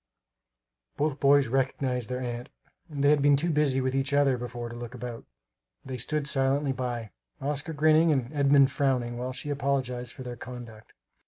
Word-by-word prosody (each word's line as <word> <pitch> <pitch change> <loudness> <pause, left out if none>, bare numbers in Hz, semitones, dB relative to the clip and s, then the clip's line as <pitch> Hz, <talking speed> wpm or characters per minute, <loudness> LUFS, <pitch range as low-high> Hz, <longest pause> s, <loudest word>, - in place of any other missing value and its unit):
Both 145 -1 0
boys 140 -1 +5
recognized 130 -1 -1
their 125 0 -3
aunt; 120 -1 -5 0.4
they 145 -1 +2
had 150 -1 +3
been 145 0 +5
too 170 +4 0
busy 145 -3 +2
with 130 0 -1
each 135 +1 -1
other 140 -2 +4
before 120 -1 -5
to 120 - -8
look 120 +1 -7
about. 120 -1 -7 0.6
They 130 -1 -5
stood 150 +4 -1
silently 135 0 +1
by, 120 -4 -4 0.3
Oscar 145 +3 -3
grinning 155 +2 +4
and 130 -1 -1
Edmund 140 -1 +5
frowning, 125 -4 0
while 125 +1 -3
she 145 +3 -5
apologized 130 -3 -1
for 130 - -9
their 125 -1 -6
conduct. 120 -3 -10
135 Hz, 170 wpm, -28 LUFS, 125-145 Hz, 0.6 s, boys